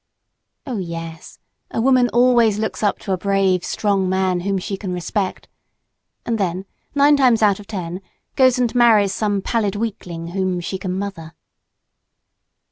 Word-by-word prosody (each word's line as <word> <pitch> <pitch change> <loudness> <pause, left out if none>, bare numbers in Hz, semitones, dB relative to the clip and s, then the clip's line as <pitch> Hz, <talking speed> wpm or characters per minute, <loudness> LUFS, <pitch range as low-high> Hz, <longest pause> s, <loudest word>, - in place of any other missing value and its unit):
Oh 250 -7 -3
yes, 165 -2 -7 0.3
a - - -3
woman 250 0 +4
always 235 -3 +4
looks 220 0 -3
up 205 -2 +1
to 195 - -5
a 185 - 0
brave, 195 -2 +1
strong 195 -3 0
man 185 -1 +1
whom 195 +2 -1
she 195 +2 -4
can 190 -1 -6
respect 185 +2 -3 0.8
and 230 -2 -1
then 185 0 -2 0.3
nine 285 +1 +5
times 245 -5 +4
out 205 -2 +3
of 205 - -12
ten, 180 -2 -5 0.3
goes 255 -2 +4
and 245 -2 0
marries 220 -5 +4
some 205 -2 -1
pallid 210 -4 0
weakling 180 -6 -5
whom 185 0 -1
she 185 +2 -4
can 185 -1 -3
"mother." 175 -5 -6
200 Hz, 155 wpm, -20 LUFS, 185-225 Hz, 0.8 s, nine